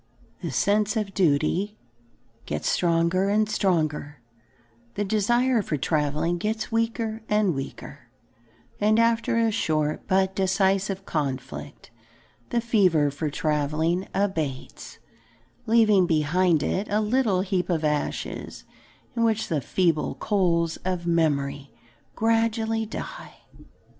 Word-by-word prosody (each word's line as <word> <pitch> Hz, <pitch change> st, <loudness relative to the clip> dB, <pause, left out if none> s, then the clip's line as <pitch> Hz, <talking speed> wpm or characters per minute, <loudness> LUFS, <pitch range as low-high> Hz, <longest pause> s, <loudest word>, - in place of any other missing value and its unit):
The -, -, -3 dB
sense 210 Hz, +2 st, +1 dB
of 205 Hz, -2 st, -2 dB
duty 180 Hz, +5 st, +1 dB, 0.7 s
gets -, -, -3 dB
stronger 170 Hz, +2 st, +2 dB
and 215 Hz, +1 st, +2 dB
stronger, 155 Hz, -, -1 dB, 0.8 s
the 205 Hz, -, -1 dB
desire 240 Hz, +4 st, +2 dB
for 155 Hz, -6 st, -2 dB
travelling 150 Hz, +4 st, 0 dB
gets 220 Hz, +4 st, -2 dB
weaker 225 Hz, -1 st, -1 dB
and 210 Hz, -4 st, +2 dB
weaker, 135 Hz, -1 st, -8 dB, 0.7 s
and 215 Hz, +1 st, +3 dB
after 230 Hz, 0 st, +2 dB
a 230 Hz, -1 st, +2 dB
short 155 Hz, -7 st, -1 dB
but 190 Hz, 0 st, +1 dB
decisive 195 Hz, 0 st, +1 dB
conflict, 135 Hz, -6 st, -4 dB, 0.6 s
the 235 Hz, -, 0 dB
fever 185 Hz, -11 st, +3 dB
for 150 Hz, +2 st, -3 dB
travelling 155 Hz, +4 st, 0 dB
abates, 160 Hz, -10 st, -3 dB, 0.7 s
leaving 215 Hz, -5 st, +4 dB
behind 165 Hz, +1 st, +2 dB
it 200 Hz, +3 st, -1 dB
a 210 Hz, -, +1 dB
little 215 Hz, -3 st, +1 dB
heap 190 Hz, -2 st, -1 dB
of 165 Hz, -3 st, 0 dB
ashes 150 Hz, -1 st, -3 dB, 0.5 s
in 230 Hz, -, +1 dB
which 220 Hz, -1 st, +1 dB
the 155 Hz, -4 st, 0 dB
feeble 165 Hz, +3 st, 0 dB
coals 170 Hz, -5 st, +1 dB
of 180 Hz, -2 st, -3 dB
memory 145 Hz, -4 st, 0 dB, 0.5 s
gradually 225 Hz, 0 st, +1 dB
die. -, -, -8 dB
190 Hz, 115 wpm, -25 LUFS, 155-215 Hz, 0.8 s, leaving